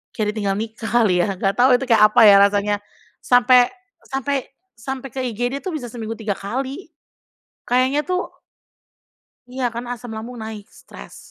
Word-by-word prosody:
kayak 210 -1 -1
ditinggal 200 -3 -1
nikah 225 0 -6 0.2
kali 180 -4 +2
ya, 195 0 -2
nggak 195 +1 -1
tahu 250 +1 +5
itu, - - -4
kayak 220 -2 +5
apa 235 - +4
ya 200 - +8
rasanya, 205 +1 +2 0.5
sampai 245 0 +5 0.4
sampai 270 +1 -2 0.4
sampai 265 +3 -6
ke 270 - -5
IGD 245 +5 -3
tuh 375 - -4
bisa 250 -6 -5
seminggu 225 -1 -5
3 210 -3 -3
kali. 265 - -5 0.8
Kayaknya 260 +4 +2
tuh 365 0 -2 1.2
Iya, 260 0 -3
kan 235 +1 -5
asam 245 0 -8
lambung 235 +3 -8
naik, 220 -2 -8 0.2
stres 65 -1 -13
240 Hz, 160 wpm, -20 LUFS, 210-260 Hz, 1.2 s, ya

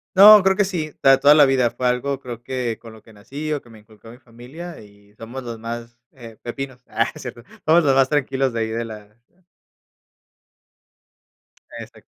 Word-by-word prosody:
No, 205 +1 +9
creo 190 0 +2
que 205 - +3
sí, 165 -6 -4
para 135 0 +5
toda 145 +1 +7
la 150 -2 +7
vida 130 -3 +1
fue 125 - -2
algo, 125 +2 -1
creo 120 -3 -9
que 125 -3 -3
con 115 - -12
lo 110 0 -15
que 110 - -19
nací, 140 +9 -6
o 145 - -3
que 120 - -20
me 110 -1 -15
inculcó 110 +1 -18
mi 120 - -14
familia 130 +8 -11
y 105 -1 -20
somos 115 +4 -8
los 120 -2 -7
más, 115 +1 -8
eh, 115 -4 -13
pepinos. 130 +1 -7
Ah, 115 - +1
no - - -6
es - - -10
cierto. 120 -2 -9 0.2
Somos 165 +2 +5
los 135 -2 +3
más 135 -1 +3
tranquilos 135 -2 0
de 115 - -4
ahí 110 - -1
de 115 +1 -3
la 105 -2 -11 2.6
Exacto. - - -12
125 Hz, 200 wpm, -21 LUFS, 115-140 Hz, 2.6 s, No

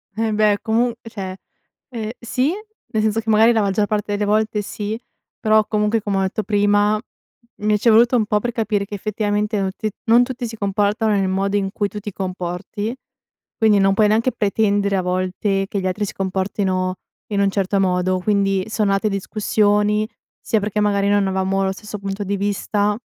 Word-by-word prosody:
Embeh, 215 -2 +2
comu 230 +2 +1
cioè, 195 -5 -6 0.5
ehm, 225 -3 -4
sì, 255 +5 0 0.4
nel 215 0 +1
senso 220 +1 +1
che 225 0 -4
magari 220 +2 +6
la 225 -2 +2
maggior 200 +1 +1
parte 210 -1 -1
delle 205 0 0
volte 215 0 +1
sì, 210 +2 -4 0.4
però 215 -1 +3
comunque, 210 +1 +1
come 200 -2 -1
ho - - +2
detto 200 +3 -1
prima, 205 0 +2 0.6
mi 210 0 +2
ci 235 - 0
è - - +7
voluto 235 +3 +5
un 220 - +3
po' 210 0 +1
per 240 +2 -2
capire 210 -3 -1
che 205 - -6
effettivamente 210 +1 -1
non 190 -1 -1
ti 215 - -2 0.2
non 235 +2 +6
tutti 245 -1 -4
si 225 0 -8
comportano 205 +2 +1
nel 195 -2 +1
modo 195 +2 0
in 195 -1 -1
cui 205 -1 -1
tu 210 - -6
ti 210 0 -6
comporti, 185 +4 -4 0.6
quindi 215 -2 +4
non 195 0 +4
puoi 215 0 +4
neanche 230 +4 +2
pretendere 200 -1 +1
a - - +1
volte 185 +2 -1
che 200 - -2
gli 185 - -1
altri 205 +3 -1
si - - -6
comportino 190 -1 -1 0.4
in 200 - +1
un 200 - +3
certo 195 0 0
modo. 185 0 +1
Quindi 195 -1 +1
sono 210 -2 +1
nate 195 +2 +1
discussioni, 210 +1 +1 0.3
sia 220 - +1
perché 210 +1 -2
magari 200 -1 +2
non 205 -1 +3
avevamo 190 +1 0
lo 190 - +1
stesso 210 +2 -8
punto 200 +1 -4
di 200 +1 -2
vista, 205 +1 0
205 Hz, 190 wpm, -20 LUFS, 195-215 Hz, 0.6 s, è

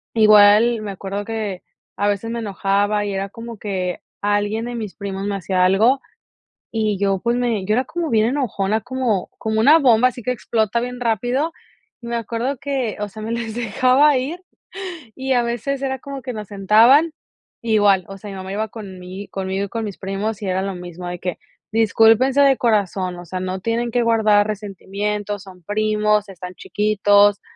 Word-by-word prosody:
igual, 215 +1 +6
me 205 -2 -5
acuerdo 195 +1 -5
que 215 -5 -4 0.3
a 205 - +1
veces, 205 +3 -1
me 235 - -3
enojaba 205 0 0
y 200 - -3
era 195 0 -3
como 230 +1 -9
que 185 -3 -3 0.2
alguien 205 +2 0
de 240 - -5
mis 215 -4 -5
primos 200 -1 -4
me 200 - -1
hacía 185 -1 +1
algo, 225 +8 +4 0.7
y 215 -3 0
yo, 195 -1 +1
pues, 235 +3 0
me 235 -5 0
yo 210 - +1
era 255 - +2
como 340 -2 -3
bien 220 -1 +3
enojona, 220 -6 0
como 245 -7 -1
como 220 0 -1
una 295 +8 +7
bomba, 250 -3 +5
así 245 -2 -10
que 250 - 0
explota 225 -1 0
bien 250 0 -5
rápido, 245 +6 0 0.5
me 235 0 -4
acuerdo 235 +4 -2
que, 270 -5 -2
o 210 - -2
sea, 215 +2 -10
me 225 - -4
les 230 -2 -3
dejaba 255 +5 +3
ir, 310 +8 -3 0.7
y 265 0 -1
a 245 -1 +3
veces 240 +4 -2
era 265 -1 -2
como 275 0 -7
que 250 -2 -4
nos 210 -3 -6
sentaban, 225 - +5 0.5
igual, 205 -5 +3
o 195 - -8
sea, 205 +1 -9
mi - - -7
mamá 190 0 -7
iba 215 +1 -2
conmi 190 -2 -9
conmigo 195 +1 -2
y - - -10
con 225 0 -3
mis 200 - -6
primos 200 +3 -3
y 200 - -4
era 185 +1 0
lo 195 -1 -3
mismo 175 0 -8
de 175 -1 -5
que: 180 -2 -3 0.3
"Discúlpense 225 +5 +4
de 275 -2 +5
corazón, 195 -5 0
o 175 - -9
sea, 185 +2 -5
no 185 0 -3
tienen 230 +2 -1
que 245 - +1
guardar 215 -2 +3
resentimiento, 205 0 -3
son 185 -2 -14
primos, 210 0 +1
están 180 -1 -9
chiquitos", 205 -1 +3
215 Hz, 185 wpm, -20 LUFS, 195-235 Hz, 0.7 s, una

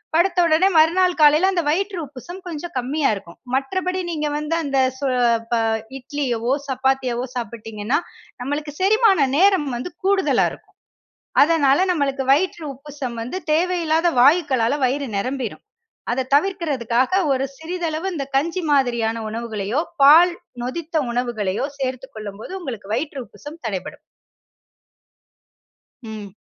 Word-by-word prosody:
படுத்த 350 +2 +3
உடனே 335 +3 +4
மறுநாள் 350 +3 +4
காலையில 305 +5 +6
அந்த 355 -3 +1
வயிற்று 385 +5 0
உப்புசம் 290 +7 -10
கொஞ்சம் 345 0 -6
கம்மியா 275 +4 0
இருக்கும். 170 -4 -11 0.2
மற்றபடி 365 +7 -1
நீங்க 305 -3 -2
வந்து 300 +2 -1
அந்த 275 -2 -1 0.2
சொ 280 - -3 0.5
ப - - +3 0.4
இட்லியவோ, 255 -3 -2
சப்பாத்தியவோ, 260 -2 0
சாப்பிட்டிங்கன்னா, 225 0 -3 0.4
நம்மளுக்கு 290 +3 -3
செரிமான 390 - +4
நேரம் 375 -3 +4
வந்து 245 +9 -4 0.2
கூடுதலா 390 0 +3
இருக்கும். - - -15 0.7
அதனால 300 +1 +3
நமக்கு 275 -5 -1
வயிற்று 330 +3 +1
உப்புசம் 275 -3 -7
வந்து 250 +11 -4
தேவையில்லாத 335 0 +2
வாயுக்களால 280 -3 +3
வயிறு 275 +2 -1
நிரம்பிரும். 255 +2 -3 0.5
அத 260 +1 -1
தவிர்க்கற்துக்காக, 280 - +1 0.2
ஒரு 265 +1 -1
சிறிதளவு 335 +2 -3
இந்த 275 -3 -3
கஞ்சி 335 +6 0
மாதிரியான 235 -4 +1
உணவுகளையோ, 225 +3 -2 0.2
பால் 335 +5 +8 0.3
நொதித்த 315 +4 -2
உணவுகளையோ, 235 -3 -1
சேர்த்துக் 260 0 -4
கொள்ளும் 205 -1 -7
போது - - -8
உங்களுக்கு 230 - -7
வயிற்று 275 +1 -3
உப்புசம் 300 +1 -12
தடைபடும். 190 -4 -5 2.0
ம். 215 -4 -8
285 Hz, 120 wpm, -21 LUFS, 245-335 Hz, 2.0 s, பால்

